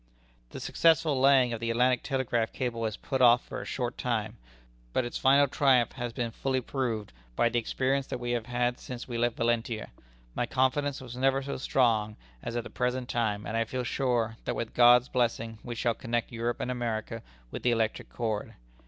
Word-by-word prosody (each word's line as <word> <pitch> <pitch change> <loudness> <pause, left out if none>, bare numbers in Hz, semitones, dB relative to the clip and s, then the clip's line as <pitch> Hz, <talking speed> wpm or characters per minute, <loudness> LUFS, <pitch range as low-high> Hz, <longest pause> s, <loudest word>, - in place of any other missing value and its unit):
"The - - -8
successful 160 -4 +2
laying 135 -3 +5
down - - -2
of 115 - -4
the 115 0 -2
Atlantic 125 +2 +2
Telegraph 120 -5 -1
Cable 115 -3 -2
is 110 - -5
put 135 -1 -3
off 120 0 +6
for - - -6
a - - -8
short 125 -2 -3
time, 110 -2 -2 0.6
but 130 - +1
its 120 - -4
final 140 +2 +5
triumph 130 -3 +3
has 120 -2 -4
been 115 0 -3
fully 130 +3 -1
proved, 120 - -3 0.2
by 115 - +3
the 120 +1 +1
experience 135 +3 -1
that - - -3
we 120 0 -3
have 120 -1 -2
had 125 0 0
since 125 -1 -7
we 120 -2 -3
left 120 -1 0
Valentia. 115 -1 -1 0.4
My 120 - -1
confidence 135 +2 0
was 125 -2 -8
never 135 +1 +2
so 140 - -4
strong 110 -5 +1 0.2
as 115 - -5
at 120 - -1
the - - -10
present 125 0 -1
time, 105 -3 -1
and 110 - -4
I 115 - +2
feel 125 +3 -4
sure, 120 -3 0
that - - -1
with 115 - -4
God's 120 +1 +6
blessing, 115 -3 -1
we 120 -1 -5
shall 120 0 +1
connect 115 +1 -2
Europe 120 +1 -2
and 125 - -2
America 115 -2 -3 0.3
with - - -5
the 125 - +2
electric 115 -2 0
cord. 110 -3 -3
120 Hz, 205 wpm, -29 LUFS, 115-130 Hz, 0.6 s, off